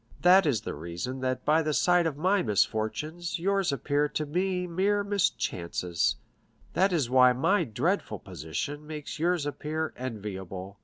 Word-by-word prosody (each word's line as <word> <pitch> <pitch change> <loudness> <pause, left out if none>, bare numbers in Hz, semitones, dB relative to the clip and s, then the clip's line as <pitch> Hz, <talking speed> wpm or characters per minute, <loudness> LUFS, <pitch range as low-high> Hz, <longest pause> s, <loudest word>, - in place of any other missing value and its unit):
That 185 0 +7
is 120 -8 +1
the - - -5
reason 85 - -5
that 130 0 -2
by 155 +2 +4
the 155 -2 -1
side 175 -1 +4
of 145 -3 -3
my 185 +5 +2
misfortunes 120 - -1
yours 195 0 +1
appear 145 +1 0
to 155 - -2
me 180 +4 -1
mere 195 +4 +1
mischances; 90 - 0 0.6
that 190 +1 +3
is 155 -8 +1
why 125 0 +6
my 165 +11 +2
dreadful 145 - -1
position 145 - -5
makes 150 -1 -6
yours 170 -2 +1
appear 155 +2 -3
enviable. 100 -5 -6
150 Hz, 150 wpm, -28 LUFS, 115-175 Hz, 0.6 s, That